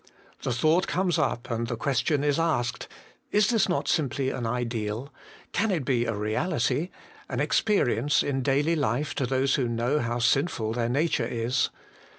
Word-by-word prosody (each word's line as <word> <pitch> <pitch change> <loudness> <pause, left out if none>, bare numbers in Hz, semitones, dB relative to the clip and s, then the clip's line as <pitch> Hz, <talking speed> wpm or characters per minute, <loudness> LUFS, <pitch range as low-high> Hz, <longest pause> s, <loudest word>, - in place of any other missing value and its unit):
The 130 - -2
thought 155 +9 +2
comes 180 -2 +1
up, 125 -4 -1
and 115 0 -1
the 120 - -2
question 140 +3 0
is 145 +1 +1
asked: 155 -8 0 0.4
Is 210 0 +3
this 220 -5 +2
not 175 - 0
simply 135 -3 0
an 120 -3 -3
ideal? 115 +1 -3 0.4
can 225 +2 +1
it 165 -9 -1
be 120 -3 +1
a 115 - -1
reality, 125 - 0 0.4
an - - -3
experience 145 - +2
in 135 -2 -1
daily 145 +5 +2
life 145 -1 0
to 130 - -1
those 135 +1 +1
who 130 -4 +1
know 120 +5 0
how 120 -2 -1
sinful 120 -2 +1
their 115 0 -1
nature 140 -2 +1
is 120 +2 0
135 Hz, 165 wpm, -27 LUFS, 120-155 Hz, 0.4 s, Is